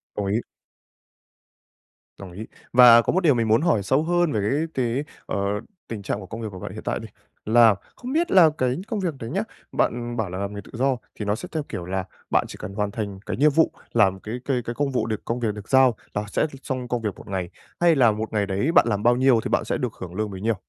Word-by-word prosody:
Đồng 105 - -2
ý. 100 +3 +1 1.8
Đồng 95 -2 -9
ý. 105 +5 -8 0.3
Và 120 -1 +9
có - - -1
một 185 - +3
điều 155 -4 +5
mình 115 -2 0
muốn 110 +3 +4
hỏi 155 - +2
sâu 130 +9 +2
hơn 175 -1 +2
về 110 - 0
cái 150 +6 +1
cái, 125 +2 0 0.2
ờ, - - -3 0.5
tình 110 -3 -5
trạng 100 +1 -3
của 100 - -9
công 115 +5 -7
việc 110 - -3
của 95 - -9
bạn - - -6
hiện - - -8
tại - - -2
đi. - - -8 0.4
Là 115 -1 +6 0.2
không 250 +2 -6
biết 335 +3 +1
là 175 -4 +7
cái 125 0 +1
công 220 -2 -2
việc 180 -4 -1
đấy 115 - -6
nhá, - - 0 0.3
bạn 120 0 -1
bảo 110 -5 -1
là 90 - -5
làm 100 +1 -3
nghề 100 - -6
tự - - -16
do 130 +2 +1 0.2
thì 105 - -5
nó 105 +1 +1
sẽ - - -7
theo 155 -2 -2
kiểu 90 -6 -5
là 95 +1 -2 0.2
bạn - - +2
chỉ - - -9
cần 100 - -6
hoàn 105 0 -1
thành 100 -4 -5
cái - - -3
nhiệm 150 +3 +5
vụ, 160 +3 +3 0.2
làm 95 -1 +3
cái 110 +4 -6
cái 130 -3 0
cái 120 - -4
công 145 +1 0
vụ 130 - 0
được 110 -2 -4
công 120 +2 -2
việc 115 -3 0
được 105 0 -10
giao 130 -3 +5 0.2
là 105 - -1
sẽ - - 0
l 150 -3 -3
xong 130 -2 -3
công 120 -1 -2
việc 105 -4 -3
một - - -13
ngày, 95 -3 -3 0.3
hay 170 -1 +5
là 125 -5 +5
một 110 +1 -4
ngày 105 -2 +1
đấy 100 +10 0
bạn 170 - +5
làm 105 -2 -1
bao 120 +1 +5
nhiêu 130 -2 +4
thì - - -3
bạn - - +1
sẽ - - -1
được - - -3
hưởng 90 -2 -9
lương 105 0 -2
bấy 95 - -7
nhiêu? 115 +1 +1
115 Hz, 270 wpm, -24 LUFS, 105-135 Hz, 1.8 s, Và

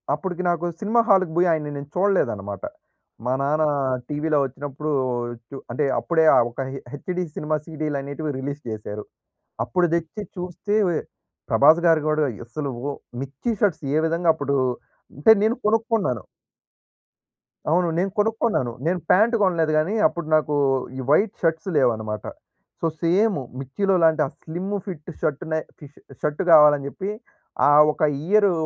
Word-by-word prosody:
అప్పటికి 180 +4 -4
నాకు 175 0 0 0.2
సినిమా 225 +3 +3
హాల్‌కి 190 -4 +4
పోయి 180 +1 +4
ఆయన్ని 150 -2 -2
నేను 140 0 -8
చూడలేదన్నమాట. 105 - 0 0.6
మా 125 - +1
నాన్న 150 +3 +1 0.5
టీవీ‌లో 150 0 0
వచ్చినప్పుడు 140 +3 -5 0.6
చు - - -9 0.2
అంటే 140 +5 0
అప్పుడే 160 -2 +2
ఆ - - +6
ఒక 120 - -5
హె 135 - -6
హెచ్‌డీ 180 +5 -3
సినిమా 155 0 -1
సీడీలు 155 -3 -3
అనేటివి 145 +2 -4
రిలీజ్ 140 +2 -5
చేశారు. 105 -1 -6 0.6
అప్పుడు 175 +9 +1
తెచ్చి 170 +5 -4
చూస్తే 180 +3 -3
వె 165 - 0 0.5
ప్రభాస్‌గారు 160 +1 +5
కూడా 155 0 +2 0.2
అసలు 140 +3 -4 0.2
ఓహ్! 140 - -5 0.2
'మిర్చి' 140 - -3
షర్ట్స్ 165 -6 +1
ఏ - - +4
విధంగా 165 +1 +2
అప్పుడు 140 -2 -1 0.6
అంటే 150 - +7
నేను 220 +2 +2
కొనుక్కున్నాను. 220 - 0 1.5
అవును 175 +2 +3
నేను 190 +2 0
కొనుక్కున్నాను. 210 - +1
నేను 180 +2 +1
ప్యాంట్ 220 +5 +4
కొనలేదు 165 -4 +2
కానీ 155 +7 +1
అప్పుడు 170 -3 -6
నాకు 150 -1 +1 0.4
ఈ - - -5
వైట్ 200 +7 +3
షర్ట్స్ 165 +2 0
లేవన్నమాట. 110 -5 0 0.6
సో, 165 - +2
సేము 185 0 +2 0.2
'మిర్చిలో' 185 +9 0
లాంటి 160 -1 +4
ఆ - - -3
స్లిమ్ 180 +5 -5
ఫిట్ 175 -5 -7
షర్ట్‌నే 155 +1 -1 0.3
ష్ - - -36 0.3
షర్ట్‌ 150 +5 -1
కావాలని 150 -3 +7
చెప్పి 190 +7 -5 0.6
ఆ - - +6 0.2
ఒక - - -11 0.2
ఇయరు 205 +1 +4
160 Hz, 140 wpm, -23 LUFS, 145-185 Hz, 1.5 s, అంటే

